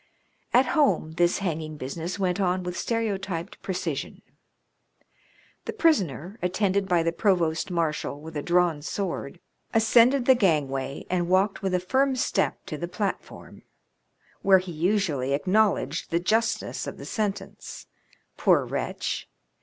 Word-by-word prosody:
At 255 +2 +5
home 285 - +2
this 175 +2 +2
hanging 160 -5 -3
business 165 +7 -5
went 190 0 0
on 185 0 +1
with 180 0 -4
stereotyped 195 -6 -3
precision. 190 -2 -4 1.4
The 455 - -4
prisoner, 200 - +1
attended 190 +2 0
by 175 -3 +2
the 165 - +1
provost 170 -3 +1
marshal 160 -4 -1
with 160 +1 -10
a 145 - -1
drawn 175 -2 +2
sword, 175 -1 -4 0.4
ascended 235 +4 +5
the 260 - +7
gangway, 140 - 0
and 175 -1 0
walked 190 +2 +2
with 190 -2 0
a - - +2
firm 265 +8 +1
step 210 -5 0
to 155 -6 -6
the 175 - -3
platform, 200 +2 -5 0.8
where 195 -1 +6
he 185 -1 -4
usually 160 -6 0
acknowledged 195 +8 +1
the 170 - +1
justness 220 +6 0
of - - -6
the - - -9
sentence 200 -1 -4 0.3
— - - -35
poor - - +3
wretch - - -3
185 Hz, 140 wpm, -26 LUFS, 165-205 Hz, 1.4 s, the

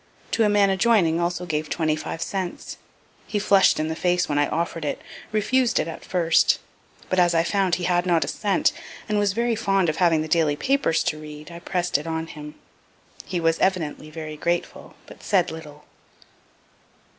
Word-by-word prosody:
To 230 - +2
a 210 - +3
man 205 -1 +4
adjoining 190 -5 +3
also 175 +1 -2
gave 155 -2 -2
twenty 155 -2 0
five 160 +1 -5
cents; 190 -3 -5 0.5
he 210 - -2
flush'd 200 -4 +4
in 155 - 0
the 160 - -3
face 180 +1 +1
when 145 -1 0
I 145 - +3
offer'd 165 -1 -2
it 145 - -2 0.3
refused 235 +3 +2
at 165 0 -4
first, 170 -3 +3 0.5
but 185 - 0
as 175 -1 +4
I 165 - +4
found 190 0 +1
he 180 - -5
had 175 0 +1
not 170 -2 +2
a - - -10
cent, 205 -3 +1 0.3
and 210 -1 +1
was 205 -2 +1
very 235 +2 0
fond 195 -5 +1
of 155 - -2
having 165 -3 +3
the - - -5
daily 155 -2 +2
papers 270 - +1
to 155 - -2
read, 150 +1 -10
I 170 - -8
prest 175 -2 -1
it 150 - -8
on 160 0 -2
him. 150 -2 -10 0.7
He 180 - -2
was 165 -1 +1
evidently 165 -5 -1
very 155 -1 -7
grateful, 170 +2 -3
but - - -14
said 190 -5 +1
little. 150 -2 -10
170 Hz, 190 wpm, -24 LUFS, 160-195 Hz, 0.7 s, man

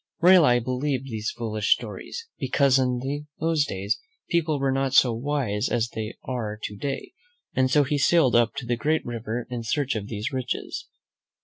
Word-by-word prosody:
Raleigh 170 -9 +6
believed 130 +2 -2
these 110 -1 -2
foolish 110 -2 +1
stories, 460 -1 -8
because 135 0 +3
in 130 +3 -1
those 160 -2 +2
days 95 +1 -2 0.3
people 160 -3 +1
were 135 0 +1
not 135 0 0
so 125 -3 +6
wise 120 -4 -1
as 120 -1 0
they 110 -1 -5
are 110 -5 -3
to 105 - -4
day, 135 - -4 0.4
and 130 0 +2
so 145 +3 +4
he 145 +2 0
sailed 140 -3 +4
up 120 -1 +4
the 120 -2 -1
great 155 +5 0
river 120 0 -4
in 120 -1 -3
search 135 +4 0
of 105 -2 -4
these 110 +5 -4
riches. 130 -1 -3
130 Hz, 170 wpm, -25 LUFS, 115-145 Hz, 0.4 s, Raleigh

